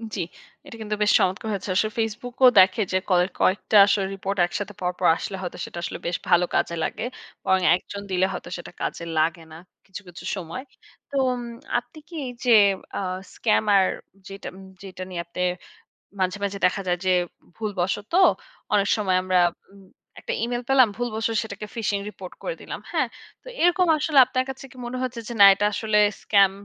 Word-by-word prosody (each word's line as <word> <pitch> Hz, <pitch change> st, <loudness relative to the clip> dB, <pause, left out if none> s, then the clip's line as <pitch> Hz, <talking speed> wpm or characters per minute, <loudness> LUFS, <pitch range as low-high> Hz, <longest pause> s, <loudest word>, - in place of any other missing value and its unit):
জ্বী। 190 Hz, -, -2 dB, 0.4 s
এটা -, -, -10 dB
কিন্তু 210 Hz, -1 st, -2 dB
বেশ 210 Hz, -, +4 dB
চমৎকার 190 Hz, +4 st, 0 dB
হয়েছে। 200 Hz, -1 st, -4 dB
আসলে 215 Hz, +3 st, +2 dB
Facebook 225 Hz, +2 st, -3 dB
ও -, -, +11 dB
দেখে 185 Hz, +3 st, +5 dB
যে, 185 Hz, -, +2 dB
কয়েক 180 Hz, 0 st, +3 dB
কয়েকটা 205 Hz, +3 st, +3 dB
আসলে 200 Hz, -1 st, +1 dB
রিপোর্ট 195 Hz, 0 st, -4 dB
একসাথে 205 Hz, +3 st, -5 dB
পরপর 180 Hz, 0 st, -2 dB
আসলে 195 Hz, -, -5 dB
হয়তো, 180 Hz, -, -6 dB
সেটা -, -, -10 dB
আসলে -, -, -4 dB
বেশ 170 Hz, -, -1 dB
ভালো 175 Hz, 0 st, +5 dB
কাজে 170 Hz, -, +1 dB
লাগে। -, -, -3 dB, 0.4 s
বরং 190 Hz, 0 st, +2 dB
একজন 200 Hz, +2 st, -7 dB
দিলে 185 Hz, 0 st, +2 dB
হয়তো, 180 Hz, -, -7 dB
সেটা 175 Hz, -, -10 dB
কাজে -, -, -3 dB
লাগে 160 Hz, +2 st, +1 dB
না, -, -, -10 dB, 0.3 s
কিছু, 190 Hz, +1 st, -9 dB
কিছু, 175 Hz, 0 st, -11 dB
সময়। 185 Hz, +5 st, -6 dB, 0.5 s
তো, 280 Hz, -, -8 dB, 0.2 s
উম 250 Hz, -1 st, -3 dB, 0.4 s
আপনি 245 Hz, -, -19 dB
কি 345 Hz, -, -10 dB, 0.3 s
যে, 245 Hz, -, +4 dB, 0.5 s
আ -, -, -1 dB, 0.4 s
স্কাম্যার 210 Hz, -3 st, +3 dB, 0.4 s
যেটা 195 Hz, 0 st, -8 dB, 0.4 s
যেটা 185 Hz, -1 st, -8 dB
নিয়ে 175 Hz, -2 st, -4 dB
আপনি 170 Hz, +1 st, -10 dB, 0.8 s
মাঝে, 185 Hz, +1 st, 0 dB
মাঝে, 200 Hz, 0 st, -3 dB
দেখা 180 Hz, +2 st, 0 dB
যায় 180 Hz, -, +1 dB
যে, 185 Hz, -, +2 dB, 0.5 s
ভুলবশতঃ 205 Hz, -, 0 dB, 0.5 s
অনেক 205 Hz, -1 st, +3 dB
সময় 195 Hz, -4 st, +1 dB
আমরা 185 Hz, -1 st, +2 dB, 0.3 s
উম 200 Hz, -1 st, -17 dB, 0.4 s
একটা -, -, -4 dB
Email 240 Hz, +1 st, -2 dB
পেলাম। 265 Hz, -4 st, +6 dB
ভুলবশতঃ 225 Hz, -1 st, -2 dB
সেটাকে 210 Hz, -1 st, -7 dB
ফিশিং 210 Hz, -3 st, 0 dB
রিপোর্ট 185 Hz, -3 st, -10 dB
করে -, -, -3 dB
দিলাম। -, -, -7 dB
হ্যাঁ, -, -, +1 dB, 0.3 s
তো -, -, -33 dB, 0.2 s
এরকম 355 Hz, +1 st, +4 dB
আসলে 300 Hz, -1 st, +2 dB
আপনার 255 Hz, 0 st, -1 dB
কাছে 265 Hz, 0 st, -8 dB
কি -, -, -17 dB
মনে 250 Hz, -, -5 dB
হচ্ছে 250 Hz, -2 st, -3 dB
যে, -, -, -5 dB
না -, -, +11 dB
এটা 205 Hz, -, 0 dB
আসলে 215 Hz, -1 st, +1 dB, 0.3 s
স্কাম 200 Hz, -2 st, +5 dB
200 Hz, 180 wpm, -24 LUFS, 185-225 Hz, 0.8 s, ও